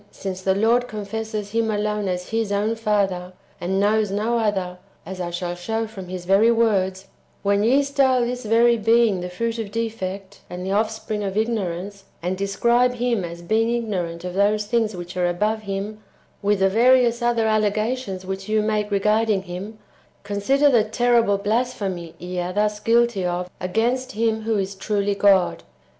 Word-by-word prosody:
223 190 0 -2
the 205 +3 +1
Lord 245 +1 +3
confesses 215 0 -5
Him 225 0 0
alone 210 -1 -1
as 180 -1 -3
His 225 -2 -1
own 205 +2 +1
Father, 195 -5 -1 0.3
and 190 +2 -1
knows 210 +1 +2
no 215 +4 0
other, 190 -5 -1 0.3
as 185 -1 -6
I 175 - -3
shall 175 0 -3
show 220 +6 -2
from 200 -4 -9
His 180 -1 -6
very 195 +5 +4
words, 195 -5 +1 0.2
— - - -38
when 200 0 +2
ye 265 +6 +4
style 275 -2 +2
this 250 +1 -4
very 230 +2 +4
Being 225 -3 +3
the 180 - -4
fruit 230 +5 -3
of 220 -3 -4
defect, 200 -3 -4
and 180 +1 -6
the 190 - -2
offspring 215 0 -1
of 195 0 -3
ignorance, 200 -3 -2
and 180 +2 -2
describe 235 +6 +2
Him 240 -4 0
as 170 0 -7
being 220 +5 +1
ignorant 190 -8 -2
of 180 0 -5
those 205 +2 +2
things 220 -1 0
which 175 +1 -8
are 180 -1 +1
above 210 +5 0
Him, 205 +1 -5 0.4
with 205 -1 +1
the 195 - +4
various 240 +2 +4
other 240 -1 +1
allega 215 +2 +1
tions 195 -8 -7
which 190 +1 -5
you 215 0 +2
make 210 -1 0
regarding 210 0 +2
Him, 190 +4 -7 0.2
— - - -35
consider 205 +9 +2
the 235 -4 +4
terrible 230 -1 +2
blasphemy 200 -6 -2
[ye 180 0 -5
are 175 +1 -2
thus 210 +1 0
guilty 230 -2 +2
of] 180 0 -2
against 235 +8 -1
Him 220 0 0
who 215 -3 0
truly 200 +1 -2
is 200 - -2
God. 195 -3 +4
210 Hz, 180 wpm, -22 LUFS, 190-225 Hz, 0.4 s, very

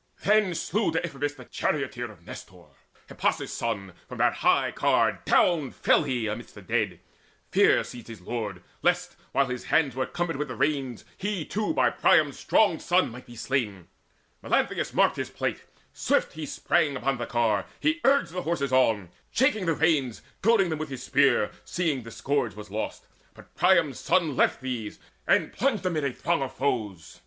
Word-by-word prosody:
Then 210 -3 +3
slew 195 +3 0
Deiphobus 145 -3 -2
the 130 -3 -12
charioteer 130 -5 -2
Of 85 -5 -19
Nestor, - - -11 0.4
Hippasus' - - -1
son: 95 -2 -3 0.2
from - - -7
that - - +3
high - - +2
car - - +2
Down 160 -7 +3
fell - - +3
he 125 -5 -1
'midst 120 +2 -10
the 100 - -11
dead; 105 -5 -1 0.5
fear - - +4
seized 120 -2 -10
his 115 -3 -9
lord 100 -2 -5 0.2
Lest, - - +1 0.2
while 140 - +3
his 125 -1 -5
hands 150 -5 +2
were 130 0 -1
cumbered 175 -3 -2
with 150 +1 -2
the - - -6
reins, 135 -5 -1
He 195 -5 -2
too 215 +5 -1
by - - +3
Priam's - - +3
strong 200 -7 +3
son 180 -6 +2
might 125 +2 -11
be 120 - -12
slain. 115 -7 -2 0.5
Melanthius - - 0
marked - - +3
his - - -3
plight: - - -3 0.3
swiftly 160 - 0
he - - -3
sprang 155 -2 +1
Upon 130 0 -1
the 120 - -3
car; 110 -5 +1
he 315 +3 +1
urged 275 -8 +3
the 180 +1 -3
horses 150 -6 -1
on, 110 -8 +3 0.2
Shaking 230 -8 +1
the 165 - +2
reins, 145 -7 +1 0.2
goading 205 -3 +4
them 160 -2 -2
with 155 - -4
his 130 -2 -6
spear, 140 -2 +3
Seeing 160 -7 -1
the 115 - -10
scourge 120 -3 -1
was 105 -2 -10
lost. 110 +1 -4 0.3
But - - -16
Priam's 170 -6 +3
son 160 -7 +1
Left - - +2
these, 125 -5 -4 0.3
and - - +2
plunged 240 -7 0
amid 165 -5 0
a 140 - 0
throng 170 +4 -1
of 135 - -4
foes. 110 - -3
140 Hz, 180 wpm, -27 LUFS, 120-170 Hz, 0.5 s, fear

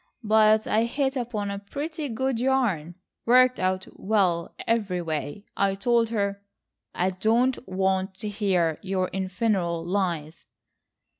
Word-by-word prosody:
But 215 0 +4
I 220 +2 +2
hit 270 +3 -1
upon 225 -5 -2
a 200 - -4
pretty 295 +8 -5
good 255 +1 -1
yarn,—worked 245 - +1
out 185 0 0
well 190 -5 +1
everyway. 180 -6 -1
I 195 -1 +1
told 230 +2 +2
her—" 200 -3 -1 0.5
"I 185 +2 +1
don't 230 +7 +2
want 190 0 0
to 210 - -6
hear 185 -6 0
your 185 -1 -1
infernal 185 -3 -1
lies." 170 -4 -2
200 Hz, 120 wpm, -26 LUFS, 185-230 Hz, 0.5 s, But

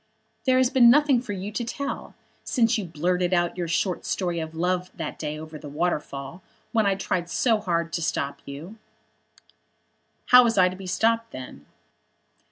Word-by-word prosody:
"There 255 0 +5
has 255 0 +3
been 245 -4 +7
nothing 280 -1 +5
for 225 -5 -5
you 195 +2 -5
to 240 - -3
tell, 275 +4 -5 0.3
since 230 -4 +2
you 210 - -2
blurted 180 +3 0
out 175 0 +1
your 175 -2 -3
short 175 +2 -1
story 175 -3 -1
of 160 0 -6
love 180 +2 -1
that 160 -2 -5
day 150 -1 -4
over 155 0 -9
the 145 - -9
waterfall, 150 0 -3 0.3
when 220 -3 +2
I 195 - +2
tried 180 -2 -2
so 225 +3 +2
hard 170 -4 -1
to 170 - -1
stop 140 -3 -2
you." 160 +10 -9 1.5
"How 250 0 +9
was 230 -2 +1
I 185 -1 +6
to 185 - -7
be 190 0 -9
stopped 230 +4 +1
then?" 125 - -10
180 Hz, 175 wpm, -25 LUFS, 165-225 Hz, 1.5 s, How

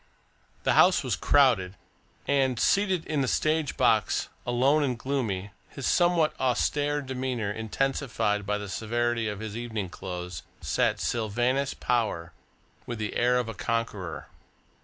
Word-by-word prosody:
The - - +3
house - - +5
was - - 0
crowded, 115 -10 +3 0.5
and, 135 -4 +2
seated 190 -4 +2
in 150 -2 0
the 130 - 0
stage 155 +2 0
box, - - +2 0.2
alone 130 +5 +3
and 130 -4 0
gloomy, 115 -7 -2 0.2
his 135 - -6
somewhat 175 -3 +3
austere 145 +3 +1
demeanour 130 -5 -2
intensified 110 -1 -1
by 105 +1 -1
the 105 0 -6
severity 115 +2 -1
of 105 -1 -4
his 110 -1 -5
evening 110 -5 -4
clothes, 90 -4 -6 0.2
sat - - 0
Sylvanus 120 +5 0
Power 95 -9 -1 0.5
with 120 - -4
the 105 -1 -4
air 125 +1 +3
of 125 -2 -1
a 115 - -4
conqueror. 110 -5 -3
120 Hz, 140 wpm, -27 LUFS, 105-135 Hz, 0.5 s, house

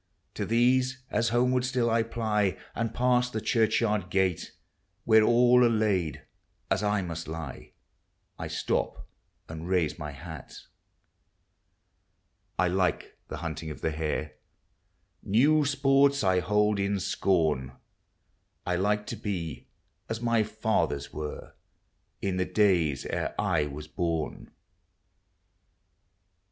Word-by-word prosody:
To - - -3
these, 130 +3 +2
as 115 -1 +1
homeward 125 +2 +2
still 125 -2 0
I 115 0 +3
ply 110 -4 0 0.2
And 115 -1 -2
pass 125 0 +2
the 110 - -3
churchyard 110 -4 +1
gate, 95 -2 0 0.5
Where 110 -1 +6
all 120 +2 +5
are 120 - +5
laid 100 - 0 0.5
as 95 +1 +2
1 105 -2 0
must 85 -1 -5
lie, 80 0 -7 0.7
I - - -4
stop - - -2 0.4
and 80 +1 -7
raise 90 -4 +1
my 75 -1 -5
hat. 80 -1 -9 2.0
I 90 - +3
like 90 0 0
the - - -6
hunting 80 0 -4
of 75 - -8
the 80 - 0
hare; 75 -1 -2 0.9
New 145 +9 +3
sports 140 -1 +3
I 95 -1 +3
hold 105 +2 +2
in 100 0 0
scorn. 80 -9 0 0.9
I 90 0 0
like 105 +3 +1
to - - -5
be 85 -6 -5 0.4
as 115 0 -2
my 115 -1 +2
fathers 105 -9 -1
were, 75 -1 -6 0.7
In 95 -2 -1
the 90 - +1
days 85 -11 +2
ere - - -3
I 75 -3 +1
was 75 +1 -7
horn. 85 -3 -2
100 Hz, 120 wpm, -28 LUFS, 85-115 Hz, 2.0 s, Where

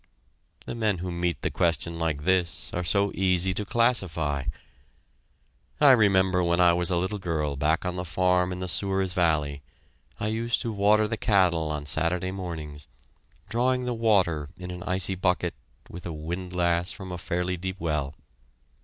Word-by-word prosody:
The - - -5
men 110 -4 0
who 90 +1 -4
meet 85 0 -2
the - - 0
question 85 0 -1
like 80 -3 -1
this 90 -1 0
are 90 - -2
so 100 +3 +1
easy 95 -1 +3
to 105 - -2
classify. 90 - +1 1.3
I 145 -2 +7
remember 95 -6 +4
when 85 0 +1
I 90 -1 +6
was 90 0 0
a 90 - +1
little 95 +4 -2
girl 75 -5 -2
back 80 +5 +1
on 90 0 -2
the 90 - -2
farm 90 +1 +1
in 90 0 -5
the 90 - -3
Souris 95 0 -1
Valley, 75 -6 +1 0.6
I - - -2
used 115 +2 0
to 115 - -2
water 105 +1 +3
the 110 +1 -3
cattle 90 -7 +2
on 75 -1 -3
Saturday 85 +5 0
mornings, 80 -6 -6 0.6
drawing 125 +2 +1
the 125 - -1
water 95 -10 +1
in 90 0 -7
an 90 0 -7
icy 95 +1 +2
bucket 90 -1 0 0.3
with 90 +1 -8
a 85 - -5
windlass 85 +2 -1
from 95 -3 -7
a 90 - -5
fairly 90 +1 -2
deep 95 +2 -5
well. 75 -4 -2
90 Hz, 170 wpm, -26 LUFS, 85-95 Hz, 1.3 s, I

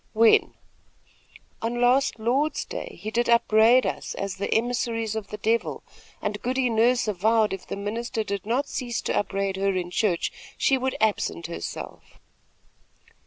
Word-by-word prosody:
"When?" 225 0 +4 1.1
"On 235 +1 -2
last 250 +2 +3
Lord's 260 +7 0
day - - -7
he 215 - -5
did 235 +1 0
upbraid 235 +1 +5
us - - -3
as 195 -1 -4
the 200 - -3
emissaries 230 -2 0
of 215 -2 -4
the 210 - -7
Devil, 225 +3 -1 0.4
and 205 0 -2
Goody 255 0 0
Nurse 235 +2 +3
avowed 215 +2 +2
if 195 - -7
the - - -4
minister 220 +3 -3
did 200 -2 -4
not 250 +6 0
cease 245 -5 -3
to - - -2
upbraid 195 -1 -1
her 195 0 +1
in 175 -1 -3
church, 180 -4 0 0.3
she 270 - +3
would 265 0 -2
absent 210 -5 0
herself." 170 - -7
225 Hz, 155 wpm, -25 LUFS, 205-240 Hz, 1.1 s, upbraid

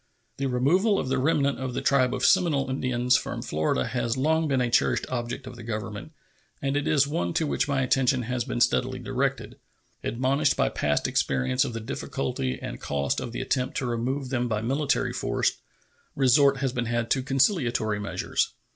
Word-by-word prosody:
The 140 - -1
removal 175 - +2
of 130 - -2
the 130 0 +1
remnant 140 0 +1
of 130 -2 -4
the - - -1
tribe 130 -3 +3
of 125 - -1
Seminole 145 -5 +3
Indians 125 -1 +2
from - - -5
Florida 75 -4 0
has 120 -1 -1
long 160 +4 +2
been 135 -3 +1
a 125 -1 0
cherished - - +2
object 120 +1 -3
of 125 -1 -9
the 120 - -10
Government, 110 +3 -5 0.5
and 140 0 -1
it 145 0 0
is 140 -2 +4
one 85 - -2
to 160 - +1
which 150 - 0
my 140 -2 +1
attention 130 0 +2
has 125 +1 -2
been 120 -1 -3
steadily 130 +2 +2
directed. 130 +2 -2 0.5
Admonished 135 +5 +1
by - - +2
past 75 0 0
experience 125 - +1
of - - -4
the 115 - -3
difficulty 65 - -3
and - - -7
cost 70 -1 -1
of 120 - -5
the 120 - -4
attempt 130 -1 -1
to 130 - -1
remove 125 +3 -2
them 125 -2 0
by 110 -2 -2
military 140 +4 0
force, - - 0 0.6
resort 135 +1 +4
has 135 -1 -1
been 125 -1 -1
had 120 0 -2
to 130 - +3
conciliatory 125 - +1
measures. 105 - -1
130 Hz, 190 wpm, -26 LUFS, 120-140 Hz, 0.6 s, is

